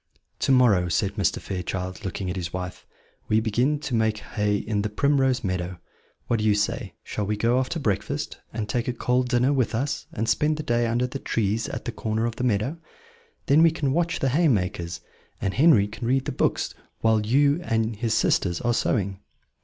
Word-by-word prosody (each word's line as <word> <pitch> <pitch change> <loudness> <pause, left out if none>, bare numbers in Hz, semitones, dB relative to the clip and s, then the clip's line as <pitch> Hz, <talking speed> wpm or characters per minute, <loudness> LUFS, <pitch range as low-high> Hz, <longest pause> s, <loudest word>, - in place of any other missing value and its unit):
"To - - +1
morrow," 110 -9 +4
said 95 +4 0
Mr. 100 -5 0
Fairchild, 95 +2 -4
looking 95 -1 -4
at - - -4
his 85 -2 -4
wife, 90 0 -6 0.4
"we 110 - +3
begin 120 +7 +1
to 140 - -4
make 110 -1 +2
hay 105 -1 -1
in 105 0 -1
the 105 - -2
Primrose 135 +1 +2
Meadow. 90 -2 -2 0.5
What 115 - 0
do 105 - -1
you 105 -1 +4
say? 105 -1 -2
Shall 105 -2 -3
we 105 0 -1
go 115 +4 +2
after 130 +6 -2
breakfast, 105 -9 -2
and 110 -2 -3
take 120 +1 -1
a 125 - 0
cold 125 +1 0
dinner 125 +2 +3
with 130 -4 +1
us, 135 +5 -2
and 110 +2 -2
spend 150 +4 +2
the 155 - -4
day 120 -2 +1
under 120 +2 +1
the 130 +2 -5
trees 110 -1 -1
at - - -6
the 120 - -2
corner 110 0 -2
of 120 -1 -3
the - - -3
meadow? 125 +6 0 0.7
Then 145 +3 +5
we 165 - +7
can 145 -4 -1
watch 170 +1 +1
the 135 - +1
haymakers, 90 - 0 0.4
and 95 - -1
Henry 135 -8 +5
can 115 +3 -6
read 130 +1 +2
the - - -2
books - - 0 0.3
whilst 110 -1 +3
you 140 +6 +3
and 115 -7 0
his 115 0 0
sisters 85 -2 +1
are 120 0 +1
sewing." 100 -5 0
115 Hz, 200 wpm, -25 LUFS, 100-130 Hz, 0.7 s, we